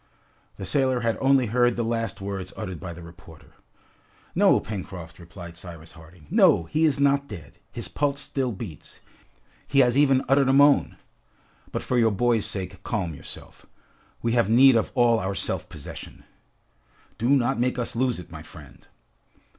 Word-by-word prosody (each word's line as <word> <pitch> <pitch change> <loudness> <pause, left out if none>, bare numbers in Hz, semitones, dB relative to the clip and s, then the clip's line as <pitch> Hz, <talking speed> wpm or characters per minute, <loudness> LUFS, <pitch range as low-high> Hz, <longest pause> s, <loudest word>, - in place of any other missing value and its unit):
The 95 - -7
sailor 130 -2 +1
had 115 -1 0
only 135 -1 +4
heard 120 +2 +2
the 120 - -1
last 115 -3 -2
words 95 -2 -5
uttered 90 -3 -5
by 85 - -7
the 85 +1 -10
reporter. 85 -1 -15 0.8
"No, - - +4
Pencroft," 95 -5 -8
replied 85 0 -11
Cyrus 85 -3 -11
Harding, 80 0 -16
"no! 85 - +5
He 155 - 0
is 145 -3 +2
not 140 0 +2
dead. 85 - -11
His - - -5
pulse 140 -1 -1
still 130 -3 -2
beats. 95 -7 -9 0.7
He 140 - +4
has 125 -1 +3
even 135 -2 +3
uttered 135 0 +3
a - - +4
moan. 140 +1 +4 0.7
But - - -3
for 125 - 0
your 115 -1 +4
boy's 115 +1 +1
sake, 95 -1 -5
calm 90 -4 -3
yourself. 70 - -12 0.6
We 115 - +1
have 115 -4 +2
need 130 +3 +6
of 115 - +1
all 120 -2 +4
our 95 0 -3
self - - -2
possession." - - -10 1.0
"Do 120 +3 0
not 135 -2 +2
make 125 +1 0
us 120 -1 -1
lose 125 0 0
it, 90 -1 -11
my 80 -2 -8
friend." 80 -2 -14
115 Hz, 170 wpm, -25 LUFS, 90-130 Hz, 1.0 s, need